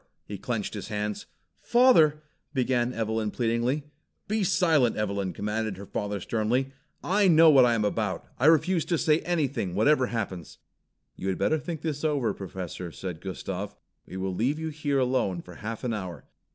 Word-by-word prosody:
He - - -7
clenched - - -3
his - - -6
hands. 105 0 -3 0.3
"Father 165 - +5
" - - -47
began 125 -1 +1
Evelyn 110 -2 -1
pleadingly. 120 +5 0 0.4
"Be 215 0 0
silent, 165 -9 +3
Evelyn!" 100 -3 -1
commanded 105 +2 -3
her 100 - -8
father 105 +1 -3
sternly. 120 +7 -1 0.3
"I 200 +2 +3
know 165 -2 +7
what 135 -3 +7
I 120 -1 +3
am 105 -2 0
about! 105 -2 -1
I 135 - +4
refuse 165 +2 +4
to 170 - 0
say 155 0 +3
anything, 140 - -1
whatever 130 +5 +3
happens." 100 -8 -5 0.6
"You 95 - -5
had 95 - -1
better 155 - +1
think 155 +2 -5
this 150 -2 -3
over, 145 -7 +1
Professor," 90 -2 -6
said 90 -1 -6
Gustav. 95 +1 -5 0.3
"We 95 - -7
will 95 0 -2
leave 125 +10 0
you 160 0 -3
here 145 -2 -1
alone 125 -9 0
for 90 - -12
half 110 0 -6
an 120 -2 -1
hour. 95 -5 -6
120 Hz, 175 wpm, -27 LUFS, 100-150 Hz, 0.6 s, know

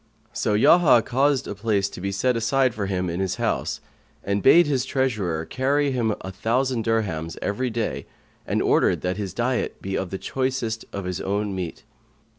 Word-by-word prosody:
So 105 - 0
Yahya 130 0 +6
caused 135 +1 +1
a - - -4
place 100 -1 0
to - - -9
be 100 +1 -2
set 125 +6 +1
aside 130 +2 +2
for 100 -3 -3
him 90 -1 -1
in 85 +1 -3
his 95 -2 -1
house - - -1 0.4
and 100 +1 -1
bade 170 - +7
his 135 -4 0
treasurer 105 - -1
carry 140 - +1
him 115 -5 0
a 95 - -6
thousand 115 +5 0
dirhams 95 -8 -1
every 125 +6 -1
day 115 -1 -3 0.4
and - - 0
ordered - - +2
that 90 +1 -2
his 100 -3 -4
diet 125 +1 -1
be 95 0 -4
of 95 - -2
the 95 - -4
choicest 130 -2 -2
of 100 -2 -5
his 90 -1 -3
own 100 +1 -1
meat. 90 -3 -5
110 Hz, 185 wpm, -24 LUFS, 95-130 Hz, 0.4 s, bade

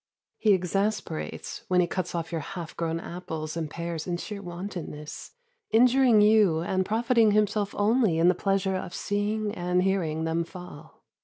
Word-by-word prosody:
He 215 -2 +4
exasperates 195 -1 -2
when 180 -1 +3
he 180 - +4
cuts 175 0 -3
off 165 0 -3
your 165 -2 -2
half 170 +2 -7
grown 165 0 -2
apples 160 -3 -6
and 160 -2 -3
pears 170 0 -5
in 175 -1 -1
sheer 200 +3 -6
wantonness, 175 -4 -7 0.4
injuring 245 -1 +5
you 210 -6 +5
and 190 +2 0
profiting 225 0 +3
himself 210 -1 +1
only 210 -4 +3
in 165 +1 +4
the 180 - +6
pleasure 195 +1 0
of 175 -1 -5
seeing 205 +1 -1
and 180 +1 0
hearing 170 -5 0
them 165 +1 0
fall. 170 -3 -12
185 Hz, 160 wpm, -27 LUFS, 170-210 Hz, 0.4 s, the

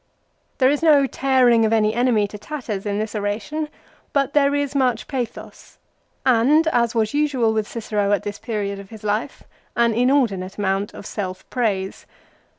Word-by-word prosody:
There 260 0 +4
is 290 - 0
no 300 -4 +5
tearing 255 -4 +3
of 220 - +2
any 215 -1 +3
enemy 235 -3 +2
to 210 - -9
tatters 220 -8 -5
in 200 0 -1
this 215 0 -3
oration, 215 +9 -3 0.4
but 280 -2 +1
there 285 -1 +3
is 285 -1 -1
much 255 -5 +1
pathos, 255 -5 -6 0.5
and, 265 +6 +4
as 235 -5 +1
was 220 -1 +1
usual 275 -7 +1
with 215 -1 -1
Cicero 210 -3 -2
at 205 -3 +1
this 205 -1 -5
period 205 -4 -3
of 195 -1 -11
his 220 -1 -12
life, 210 +6 -2 0.3
an 235 -1 +3
inordinate 230 -7 +1
amount 195 0 -1
of - - -10
self 185 -4 -5
praise. 200 -6 -2
230 Hz, 165 wpm, -21 LUFS, 205-265 Hz, 0.5 s, no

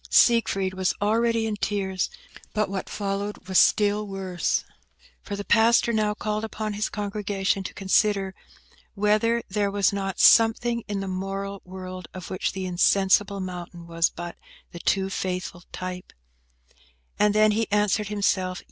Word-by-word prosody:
Siegfried 195 -5 +3
was 185 -1 0
already 225 +2 +2
in 220 -1 -1
tears, 195 -2 -1 0.5
but 215 -2 +1
what 195 -1 -4
followed 200 -1 -4
was 190 -1 +4
still 210 0 +3
worse, 190 -3 -1 0.6
for 205 - -5
the 200 0 -6
pastor 235 +1 +4
now 210 -1 +1
called 215 0 -2
upon 215 -1 -4
his 210 +1 -1
congregation 200 -1 -2
to 190 - -6
consider 195 0 +1 0.6
whether 215 +3 +2
there 205 +1 0
was 200 0 +2
not 195 -1 -3
something 235 +1 +5
in 205 -2 -2
the 195 - -4
moral 195 +1 -4
world 185 -1 -8
of 185 0 -8
which 185 - -1
the 190 -1 -4
insensible 195 +2 +3
mountain 175 -2 -7
was 165 0 +1
but 175 0 -7 0.4
the 170 - -8
too 190 +3 +1
faithful 185 -2 -4
type? 185 0 -6 1.1
And 210 0 +3
then 215 0 +5
he 220 0 -1
answered 210 0 +2
himself. 190 -3 0
200 Hz, 145 wpm, -25 LUFS, 185-210 Hz, 1.1 s, something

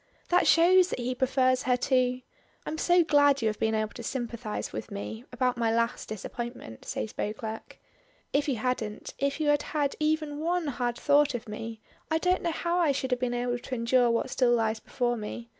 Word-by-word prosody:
That 355 +1 +4
shows 360 +2 +6
that - - -3
he 250 +1 -2
prefers 255 0 +2
her 250 -1 +2
to 255 0 +1 0.4
"I'm 315 - -4
so 350 0 +4
glad 285 -4 +4
you - - +3
have 215 - -5
been 220 0 +1
able 215 0 -1
to - - -8
sympathize 235 -3 -4
with - - -5
me 220 +3 -6
about 250 0 0
my 230 -1 +2
last 230 +1 -1
disappointment," 220 - -7
says 215 - -4
Beauclerk. 220 +1 -5 0.6
"If 290 +1 +1
you 270 - +1
hadn't 220 -2 -3
if 280 +1 0
you 305 -1 +1
had 290 0 +3 0.2
had 285 -2 +1
even 305 -1 0
one 345 +2 0
hard 245 -2 -2
thought 290 -1 +3
of 235 -1 -6
me, 220 +1 -6 0.3
I 320 - +2
don't 360 +2 +1
know 340 - 0
how 340 +2 -1
I 325 -5 +3
should 260 -1 -3
have 250 - +1
been 245 -1 -1
able 245 0 -1
to 255 - -5
endure 240 +1 +3
what 235 +2 0
still 245 -2 +3
lies 220 -1 0
before 240 0 -1
me. 230 +2 -6
250 Hz, 205 wpm, -28 LUFS, 230-290 Hz, 0.6 s, shows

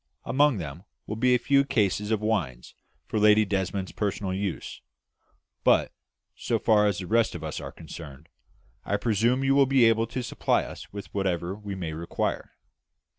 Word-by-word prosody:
Among 145 -1 +3
them 80 0 -7 0.2
will 110 - -4
be 125 +3 +3
a - - +4
few 140 +3 +3
cases 105 -5 0
of 110 -2 0
wines 90 - -2 0.3
for 110 - -2
Lady 105 0 +5
Desmond's 95 -1 -2
personal 100 -2 -2
use; 95 -1 -4 0.8
but, - - +3 0.4
so - - -1
far 105 -1 +3
as 100 -3 0
the 90 - -5
rest 115 +1 +2
of 85 - -7
us 80 -1 -4
are - - -7
concerned, 75 -1 -11 0.6
I 100 - 0
presume 115 +4 +1
you 135 0 +3
will 140 -1 +5
be 130 -3 +5
able 115 0 +3
to 125 +2 -4
supply 120 - 0
us - - -10
with 100 -1 -9
whatever 90 -2 -1
we 100 -1 -7
may 85 -4 -4
require?" 85 +2 -3
105 Hz, 175 wpm, -26 LUFS, 95-115 Hz, 0.8 s, Lady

